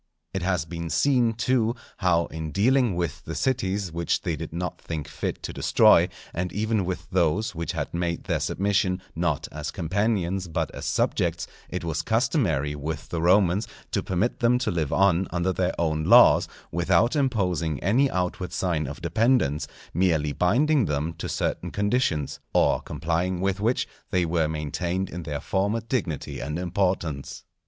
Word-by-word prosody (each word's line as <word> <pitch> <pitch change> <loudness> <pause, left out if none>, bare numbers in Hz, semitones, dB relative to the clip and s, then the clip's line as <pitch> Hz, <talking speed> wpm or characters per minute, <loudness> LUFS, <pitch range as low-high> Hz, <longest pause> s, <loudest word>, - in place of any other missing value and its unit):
It 95 - -2
has 90 -2 0
been 85 0 -5
seen, 125 - +3
too 120 0 +1 0.2
how 85 -2 +2
in 80 -1 -4
dealing 120 - +3
with 85 -5 -3
the 80 - -6
cities 100 -8 -1
which 85 0 -1
they - - -1
did - - -6
not 85 +1 -4
think 80 -3 -5
fit - - -4
to - - -4
destroy, - - +5 0.2
and 90 +1 -2
even 110 -1 0
with 90 0 -4
those 90 +3 +1
which 85 -2 -3
had - - -4
made 85 -1 -2
their - - -1
submission 95 -1 0 0.2
not 85 -3 -1
as 75 0 -5
companions 95 +1 -1
but 80 - -2
as - - -6
subjects, 85 0 0 0.2
it - - -4
was 80 -1 -1
customary 110 - +1
with 75 +2 -5
the 85 - -2
Romans 90 +2 +3 0.2
to - - 0
permit 95 +6 -1
them 120 +1 +4
to 125 - -1
live 80 -5 -1
on 95 -1 +3
under 90 +1 0
their 90 -1 0
own 80 -2 0
laws, - - +7 0.2
without 90 - +2
imposing 90 - 0
any 125 +9 +3
outward 90 -1 -2
sign 85 -5 0
of 70 +5 -8
dependence, 85 - +2 0.3
merely 80 -4 +2
binding 130 - +3
them 75 +2 -1
to - - -6
certain - - -2
conditions, 100 - 0 0.2
or - - +3
complying 85 +2 -2
with 95 +1 0
which 115 +5 +1 0.2
they 90 -2 +1
were 80 -1 +1
maintained 85 +5 -2
in 90 - -5
their 75 -3 -4
former 100 +8 0
dignity 105 - -3
and 75 +4 -3
importance. 90 -5 -2
90 Hz, 165 wpm, -25 LUFS, 80-100 Hz, 0.3 s, laws